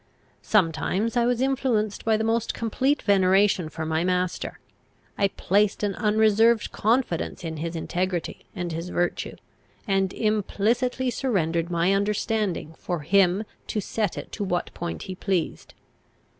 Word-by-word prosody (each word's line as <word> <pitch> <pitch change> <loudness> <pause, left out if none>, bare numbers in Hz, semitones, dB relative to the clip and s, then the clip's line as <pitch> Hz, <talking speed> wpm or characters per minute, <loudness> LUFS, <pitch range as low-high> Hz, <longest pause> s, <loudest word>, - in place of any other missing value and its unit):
Sometimes 195 +3 +1
I 240 -1 +3
was 245 0 +1
influenced 255 -6 0
by 220 -1 +3
the 220 - -1
most 225 0 0
complete 260 +5 0
veneration 190 -3 +3
for 160 0 -5
my 160 +1 0
master; 180 0 -1 0.6
I 200 - +3
placed 200 +2 +1
an 205 -1 +1
unreserved 220 +2 +3
confidence 220 -7 0
in 160 -1 -4
his 165 +2 -4
integrity 175 +1 -2
and 175 -3 -3
his 165 +2 -4
virtue, 175 -1 -1 0.5
and 195 -2 +1
implicitly 230 +5 0
surrendered 170 -10 0
my 175 +2 +2
understanding 200 -4 -1
for 175 -3 -3
him 185 +4 +3 0.2
to 215 - -1
set 210 -1 -2
it - - -7
to 210 - -4
what 180 -3 -2
point 170 0 -5
he 190 - -5
pleased. 185 -2 -2
195 Hz, 140 wpm, -25 LUFS, 175-220 Hz, 0.6 s, I